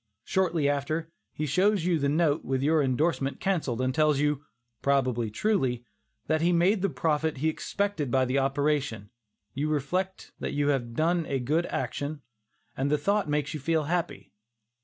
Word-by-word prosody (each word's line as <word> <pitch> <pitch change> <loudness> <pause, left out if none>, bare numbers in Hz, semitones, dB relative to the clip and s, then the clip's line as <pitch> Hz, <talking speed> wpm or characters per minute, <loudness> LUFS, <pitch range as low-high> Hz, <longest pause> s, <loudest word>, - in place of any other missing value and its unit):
Shortly 175 -6 +1
after, 155 +3 -1 0.2
he 155 - -3
shows 185 +5 +2
you 175 -3 +2
the 140 0 +1
note 155 0 +2
with 130 0 -1
your 155 +1 +3
indorsement 140 +1 0
cancelled, 150 -11 -1
and 130 0 0
tells 155 0 +3
you, 145 -1 +1 0.4
probably 130 -5 +1
truly, 125 - 0 0.4
"that 155 0 +1
he 170 +2 +3
made 180 +4 +3
the 195 - +1
profit 160 -1 0
that 130 - -10
he 160 - +3
expected 200 -2 -2
by 130 +1 +3
the 130 +2 +1
operation," 135 -6 0 0.4
you 145 +3 -1
reflect 180 +6 -2
that - - -3
you 145 0 +1
have 120 -5 -1
done 165 +2 +1
a 135 - 0
good 150 +7 0
action, 140 +3 -3 0.5
and 135 +2 0
the 150 - +3
thought 200 +3 0
makes 145 -1 0
you 155 - -4
feel 160 +2 +1
happy. 155 - -3
150 Hz, 175 wpm, -28 LUFS, 135-165 Hz, 0.5 s, your